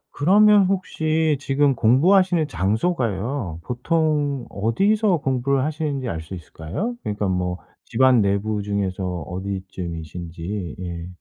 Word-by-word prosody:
그러면 205 +6 +5
혹시 160 -5 0
지금 140 -1 +2
공부하시는 165 - +3
장소가요 110 - -1
보통 145 0 0
어디서 195 - +2
공부를 135 0 0
하시는지 150 -4 -2
알 80 - -3
수 80 +4 -9
있을까요? 85 - -5
그러니까 105 -1 -2
뭐 90 -1 -1 0.3
집안 130 -3 +4
내부 100 +1 0
중에서 100 -2 -2 0.2
어디쯤이신지? 90 0 -6
예. 85 -1 -5
120 Hz, 285 characters per minute, -22 LUFS, 95-155 Hz, 0.3 s, 그러면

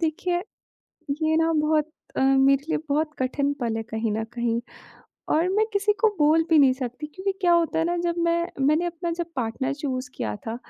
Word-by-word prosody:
देखिए 350 +2 -1 0.8
ये 315 0 +2
ना 325 0 +2
बहुत 305 0 +1 0.3
अ, - - +2
मेरे 270 +1 +4
लिए - - +1
बहुत 305 +2 0
कठिन 280 +2 0
पल 230 -3 -1
है - - -2
कहीं 220 0 -2
न 220 +1 -1
कहीं 235 -1 0 0.7
और 330 +3 +3
मैं 415 +3 +2
किसी 405 +1 +2
को 445 - +5
बोल 310 +2 +4
भी 320 - +6
नहीं 270 -3 +6
सकती 255 +3 -5
क्योंकि 375 +6 -3
क्या 355 -2 +4
होता 340 -1 +2
है 325 - +2
ना 345 +1 0
जब 340 0 +1
मैं 340 -3 -1
मैंने 305 +4 +3
अपना 345 0 -3
जब 345 - -1
पार्टनर 255 +3 -2
चूज़ 265 -3 -4
किया 105 -2 -3
था 225 +1 -3
300 Hz, 200 wpm, -25 LUFS, 260-340 Hz, 0.8 s, भी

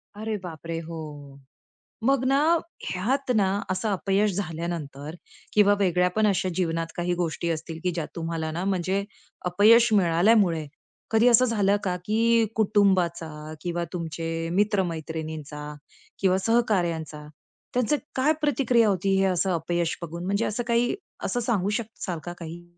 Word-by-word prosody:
अरे 215 +1 -3
बापरे! 165 -1 -6
हो. 150 -4 -8 0.7
मग 270 -1 +3
ना 270 +1 +3 0.5
ह्यात 255 +8 -1
ना 200 -3 +3 0.2
असं 185 +4 -1
अपयश 200 +1 +1
झाल्यानंतर 165 -5 -4 0.4
किंवा 205 -1 +5
वेगळ्या 180 -1 +3
पण 215 0 +3
अशा 190 -2 +1
जीवनात 165 -2 -1
काही 175 0 -1
गोष्टी 170 -1 -2
असतील, 165 0 -4
की 180 - +1
ज्या 165 -3 -3
तुम्हाला 165 -1 -3
ना 170 +3 -3
म्हणजे 190 +1 0 0.4
अपयश 220 +7 +6
मिळाल्यामुळे 175 -2 +3 0.5
कधी 225 +2 +4
असं 245 +1 +6
झालं 205 -4 +2
का, 185 -2 0
की 230 +1 +3
कुटुंबाचा 170 -7 +1
किंवा 175 -1 -2
तुमचे 165 -1 -3
मित्र-मैत्रिणींचा 160 -6 -2 0.5
किंवा 190 -1 +3
सहकार्यांचा, 175 -9 0 0.5
त्यांचं 250 +3 +2 0.2
काय 270 +4 +3
प्रतिक्रिया 250 -6 +3
होती 195 0 +1
हे 195 - +3
असं 185 0 +1
अपयश 170 0 -1
बघून? 170 +1 -6
म्हणजे 200 +4 0
असं 230 +3 -2
काही 235 +4 +2 0.3
असं 245 - -1
सांगू 220 -5 0
शकाल 210 -5 -4
का 175 - -5
काही? 170 +1 -8
180 Hz, 135 wpm, -26 LUFS, 165-215 Hz, 0.7 s, अपयश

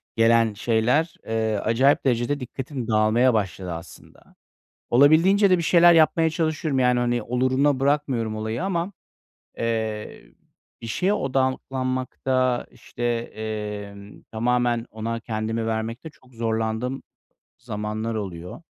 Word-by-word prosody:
gelen 115 -1 +4
şeyler, 120 +10 +1
eee, 110 -1 0
acayip 130 +9 +2
derecede 125 +3 +1
dikkatim 130 -1 -6
dağılmaya 110 +3 +3
başladı 95 -4 -2
aslında. 85 0 -12 0.5
Olabildiğince 165 - +5
de 185 - +5
bir 170 - -2
şeyler 175 +1 +6
yapmaya 160 0 +4
çalışıyorum. 155 -3 -1
Yani, 125 -1 +3
hani, 120 0 0
oluruna 130 +4 +1
bırakmıyorum 135 -6 0
olayı 110 +2 -3
ama, 185 0 -2 0.7
eee, 110 -2 -3 0.6
bir - - -6
şeye 185 - 0
odaklanmakta, 130 -3 -1
işte, 120 - -11
emm, 105 -3 -5
tamamen 120 +1 0
ona 115 +1 -4
kendimi 110 0 -3
vermekte 115 +6 -3
çok 130 -3 -24
zorlandığım 115 +3 -2 0.6
zamanlar 110 -1 -4
oluyor. 90 - -6
120 Hz, 110 wpm, -24 LUFS, 110-135 Hz, 0.7 s, şeyler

